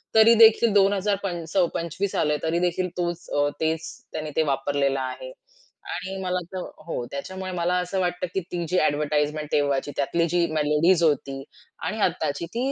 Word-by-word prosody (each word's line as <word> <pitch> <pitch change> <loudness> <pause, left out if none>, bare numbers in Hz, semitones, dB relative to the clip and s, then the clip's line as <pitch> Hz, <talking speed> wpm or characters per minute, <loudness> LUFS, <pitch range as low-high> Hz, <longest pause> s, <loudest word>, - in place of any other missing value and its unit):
तरी 220 +1 +8
देखील 225 0 +4
2000 200 0 +3
पंचस 175 -3 -4 0.2
25 170 +4 -3
आलय 150 0 +1
तरी 165 +1 +1
देखील 180 +1 0
तोच 175 -1 -3
अ, 145 0 +1
तेच 160 0 -1 0.2
त्यांनी 155 -1 -4
ते 160 - +3
वापरलेलं 140 0 0
आहे 130 - -5 0.6
आणि 190 +2 -5
मला 180 -1 -1
तर 185 - -3 0.3
हो, 145 -7 -3
त्याच्यामुळे 185 +7 -5
मला 175 0 0
असं 180 +2 -2
वाटतं, 180 0 -1
की - - +1
ती 175 -1 -2
जी 180 - +1
एडव्हर्टाइजमेंट 150 0 0
तेव्हाची 145 -1 +1
त्यातली 165 +4 +1
जी 175 +1 +2
मेलोडीज 155 +4 +3
होती 135 -3 0 0.4
आणि 220 - -3
आत्ताची 170 -4 0
ती 250 +4 0
170 Hz, 165 wpm, -25 LUFS, 150-185 Hz, 0.6 s, तरी